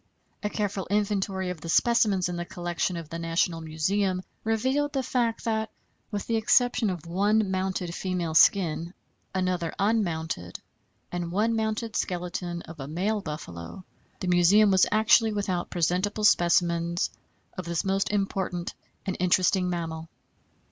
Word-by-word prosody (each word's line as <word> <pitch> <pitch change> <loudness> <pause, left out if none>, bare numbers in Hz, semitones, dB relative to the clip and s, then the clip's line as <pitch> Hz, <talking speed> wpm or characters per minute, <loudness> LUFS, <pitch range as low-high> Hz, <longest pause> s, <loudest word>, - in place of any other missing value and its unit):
A 210 - -1
careful 205 -3 -2
inventory 195 -2 0
of 170 -4 -8
the 165 - -7
specimens 215 -3 +3
in 175 - -4
the 175 - -3
collection 175 +1 -2
of 165 -2 -6
the 165 - -5
National 165 0 0
Museum 185 +4 0 0.2
revealed 260 +7 0
the 270 -2 0
fact 235 -2 -1
that, 220 -1 0 0.4
with 205 -2 -4
the 230 - 0
exception 245 0 +3
of 175 -4 -5
one 200 +4 +1
mounted 185 -2 -2
female 180 -3 -2
skin, 170 0 +3 0.4
another 185 -3 -1
unmounted, 165 - -1 0.5
and 175 -1 -3
one 220 +5 +1
mounted 220 0 -2
skeleton 175 -1 -3
of 165 -2 -11
a 135 - -5
male 195 +7 -1
buffalo, 150 - -7 0.4
the 185 - -2
Museum 180 +4 +5
was 190 -1 +5
actually 220 +1 +4
without 190 -4 -2
presentable 185 +5 0
specimens 170 -2 +3 0.4
of 185 - -5
this 170 +1 -2
most 195 0 +1
important 195 -3 -2 0.3
and 190 - -2
interesting 180 +1 +3
mammal. 165 -2 -4
185 Hz, 140 wpm, -27 LUFS, 170-210 Hz, 0.5 s, Museum